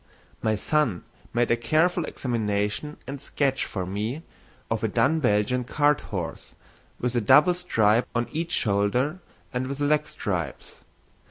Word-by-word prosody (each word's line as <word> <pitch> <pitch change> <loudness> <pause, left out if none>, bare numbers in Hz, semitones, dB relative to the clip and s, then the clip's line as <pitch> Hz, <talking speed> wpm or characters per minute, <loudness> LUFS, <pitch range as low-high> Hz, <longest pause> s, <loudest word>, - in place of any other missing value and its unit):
My 110 -1 +1
son 120 - +1 0.3
made 120 0 +1
a - - +5
careful 155 +8 +2
examination 110 +3 -2
and 135 +1 -6
sketch 135 -2 0
for 95 -3 -4
me 110 - -3 0.5
of - - -1
a - - +3
dun 160 +4 +2
Belgian 125 0 +2
cart 145 +3 +2
horse 90 -5 -6 0.4
with 125 0 -1
a 120 - +2
double 150 - +6
stripe 115 -11 +2
on 120 0 +1
each 165 +2 -2
shoulder 120 - +1 0.3
and 125 +1 -1
with 140 +1 -5
leg 150 +1 +2
stripes. - - -4
125 Hz, 145 wpm, -26 LUFS, 105-150 Hz, 0.5 s, double